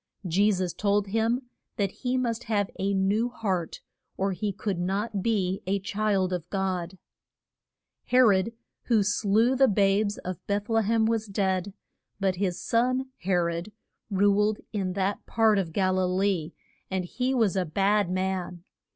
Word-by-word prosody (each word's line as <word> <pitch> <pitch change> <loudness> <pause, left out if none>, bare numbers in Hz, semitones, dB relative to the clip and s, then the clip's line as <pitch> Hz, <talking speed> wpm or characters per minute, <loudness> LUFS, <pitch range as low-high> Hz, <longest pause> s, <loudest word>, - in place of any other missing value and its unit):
Je 200 +5 +3
sus 185 -3 -1
told 205 -1 +1
him 225 +4 +1 0.3
that 200 -2 0
he 255 0 -2
must 240 -2 -2
have 205 -3 0
a 195 +1 0
new 200 +5 +1
heart 190 -8 -3 0.4
or 195 +1 0
he 205 +2 -2
could 200 -2 -3
not 200 +3 -1
be 195 -4 0
a 195 +1 +2
child 195 -1 0
of 175 -3 -4
God. 190 -2 -2 1.1
He 250 - +1
rod, 215 -4 +5 0.3
who 225 -4 +3
slew 210 +4 +2
the 270 0 +5
babes 205 0 +2
of 185 -1 -6
Beth 205 +2 -1
le 225 0 +3
hem, 220 +1 +2
was 225 -1 0
dead, 195 -1 -1 0.4
but 190 -2 0
his 185 -2 -1
son 255 +3 0
He 190 - -3
rod 170 +2 0 0.4
ruled 205 +1 +3 0.2
in 190 -3 -1
that 195 +1 -1
part 220 -2 +3
of 175 -4 -2
Gal 185 +1 +1
i - - +2
lee, 180 -3 0 0.4
and 185 -1 -2
he 255 +8 -1
was 220 -6 +2
a 190 - +2
bad 200 +3 +1
man. 185 -2 -2
200 Hz, 160 wpm, -27 LUFS, 185-220 Hz, 1.1 s, rod